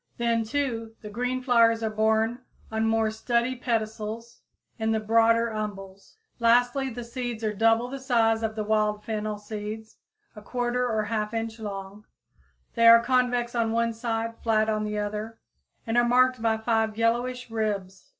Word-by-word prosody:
Then, 235 Hz, -1 st, +1 dB
too, 230 Hz, -3 st, -3 dB
the 210 Hz, -, -8 dB
green 250 Hz, +3 st, -2 dB
flowers 230 Hz, -3 st, +4 dB
are 220 Hz, -, 0 dB
borne 220 Hz, +2 st, +1 dB, 0.3 s
on 220 Hz, 0 st, 0 dB
more 225 Hz, -1 st, +1 dB
sturdy 235 Hz, +3 st, 0 dB
pedicels 225 Hz, -1 st, -3 dB, 0.4 s
in 220 Hz, 0 st, +1 dB
the 220 Hz, -, +1 dB
broader 230 Hz, +1 st, +3 dB
umbels, 195 Hz, -, -7 dB, 0.2 s
lastly 245 Hz, +3 st, +3 dB
the 240 Hz, 0 st, -6 dB
seeds 235 Hz, -1 st, -5 dB
are 215 Hz, -1 st, 0 dB
double 225 Hz, +3 st, +3 dB
the 270 Hz, +2 st, -6 dB
size 230 Hz, -4 st, +2 dB
of 220 Hz, -1 st, -2 dB
the 215 Hz, -, -2 dB
wild 210 Hz, 0 st, 0 dB
fennel 215 Hz, -1 st, -3 dB
seeds, 215 Hz, +1 st, -7 dB, 0.4 s
1/4 210 Hz, -1 st, -12 dB, 0.4 s
or 220 Hz, -2 st, 0 dB
1/2 215 Hz, 0 st, -2 dB
inch 225 Hz, 0 st, -3 dB
long. 200 Hz, 0 st, -7 dB, 0.7 s
They 230 Hz, -1 st, +4 dB
are 230 Hz, 0 st, +10 dB
convex 245 Hz, -1 st, +1 dB
on 230 Hz, -2 st, 0 dB
one 230 Hz, 0 st, +1 dB
side, 230 Hz, 0 st, -3 dB
flat 220 Hz, -1 st, +1 dB
on 215 Hz, 0 st, 0 dB
the 210 Hz, 0 st, -3 dB
other, 210 Hz, +2 st, -4 dB, 0.5 s
and 225 Hz, -, -2 dB
are -, -, +4 dB
marked 255 Hz, 0 st, +3 dB
by 225 Hz, -1 st, +2 dB
five 220 Hz, -1 st, 0 dB
yellowish 240 Hz, +2 st, 0 dB
ribs. 200 Hz, -4 st, -3 dB
225 Hz, 160 wpm, -26 LUFS, 215-235 Hz, 0.7 s, are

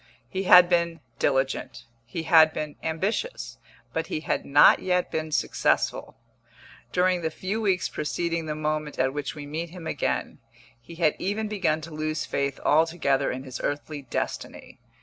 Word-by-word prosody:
He 190 Hz, +11 st, -3 dB
had 180 Hz, -1 st, +9 dB
been 170 Hz, -1 st, +1 dB, 0.2 s
diligent, 135 Hz, -1 st, 0 dB, 0.2 s
he 160 Hz, +7 st, -4 dB
had 160 Hz, -1 st, +6 dB
been 150 Hz, -1 st, -4 dB
ambitious, 195 Hz, -, -3 dB, 0.3 s
but 160 Hz, 0 st, -2 dB
he 155 Hz, -, -3 dB
had -, -, -2 dB
not 145 Hz, +1 st, +7 dB
yet 180 Hz, -1 st, 0 dB
been 155 Hz, 0 st, -3 dB
successful. -, -, 0 dB, 0.7 s
During 180 Hz, 0 st, +2 dB
the 160 Hz, -, -1 dB
few 195 Hz, +7 st, -3 dB
weeks 190 Hz, -4 st, +1 dB
preceding 165 Hz, +1 st, -2 dB
the 150 Hz, -, -2 dB
moment 155 Hz, -1 st, -2 dB
at 130 Hz, +1 st, +1 dB
which 145 Hz, 0 st, -4 dB
we 145 Hz, -1 st, -7 dB
meet 160 Hz, +4 st, -4 dB
him 175 Hz, -1 st, -10 dB
again, -, -, -2 dB, 0.4 s
he 165 Hz, +8 st, -12 dB
had 165 Hz, -3 st, +2 dB
even 210 Hz, +3 st, -2 dB
begun 180 Hz, -7 st, 0 dB
to 160 Hz, +1 st, -9 dB
lose 155 Hz, 0 st, -2 dB
faith 140 Hz, -1 st, -2 dB
altogether 155 Hz, -3 st, +2 dB
in 130 Hz, +1 st, -5 dB
his 130 Hz, -2 st, -7 dB
earthly 145 Hz, +1 st, -3 dB
destiny. 130 Hz, -, -5 dB
160 Hz, 160 wpm, -26 LUFS, 150-175 Hz, 0.7 s, had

